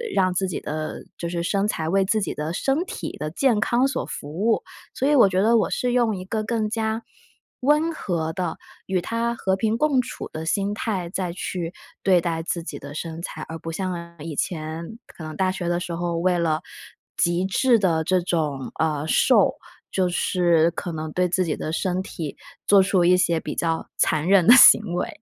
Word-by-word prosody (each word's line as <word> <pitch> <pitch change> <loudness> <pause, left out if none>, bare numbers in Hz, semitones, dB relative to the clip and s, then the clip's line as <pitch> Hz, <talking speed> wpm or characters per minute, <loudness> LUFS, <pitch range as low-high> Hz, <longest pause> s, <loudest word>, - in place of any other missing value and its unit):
让 185 -1 +3
自 190 +1 0
己 185 - -3
的， 155 +1 -5
就 170 - -4
是 170 0 -2
身 200 +3 0
材 160 -6 -2
为 195 +1 +3
自 215 +3 +1
己 - - -2
的 150 +2 -4
身 275 - 0
体 - - -6
的 150 +2 -3
健 235 - +2
康 240 +5 +2
所 270 - -2
服 - - -7
务。 205 +9 0 0.3
所 270 - 0
以 295 - +3
我 240 -7 +6
觉 185 0 +1
得 225 +3 +4
我 215 - +1
是 250 - -1
用 235 -4 +2
一 185 -1 -7
个 215 +2 -2
更 220 -1 -1
加 220 0 -1 0.6
温 300 +5 +3
和 170 - -2
的， 175 -1 -3 0.3
与 190 -1 +1
它 230 +5 -1
和 190 -4 0
平 220 +3 0
共 280 -2 +3
处 - - -7
的 155 0 -5
心 200 +4 0
态 200 -5 -3
再 180 -1 -3
去 175 -1 -4 0.3
对 185 -2 +5
待 165 -1 -2
自 170 +1 -2
己 - - -6
的 145 0 -9
身 165 +1 -5
材。 160 - -6
而 165 - -5
不 165 - -6
像 170 -1 -5
以 155 0 -6
前， 165 +6 -4
可 160 - -12
能 155 -1 -6
大 190 -1 +1
学 185 -2 -4
的 175 0 +1
时 175 -1 -5
候 170 0 -2
为 180 +1 +2
了， 160 -2 0 0.5
极 175 +1 +1
致 235 +5 +3
的 165 -5 +1
这 185 +3 +2
种， 155 -6 -2
呃， 155 -1 0
瘦， - - +4 0.4
就 185 -2 +1
是 170 -2 +2
可 175 - -5
能 155 -1 -4
对 180 0 +1
自 185 +1 +1
己 155 - -1
的 155 - -4
身 185 +2 -1
体， 160 -6 -6 0.3
做 200 -1 +6
出 190 -2 +2
一 180 +1 +6
些 170 -2 +2
比 - - -6
较 165 -1 -1
残 155 +1 +1
忍 190 -3 +5
的 240 - +9
行 240 - +9
为。 180 - -1
180 Hz, 225 characters per minute, -23 LUFS, 165-210 Hz, 0.6 s, 的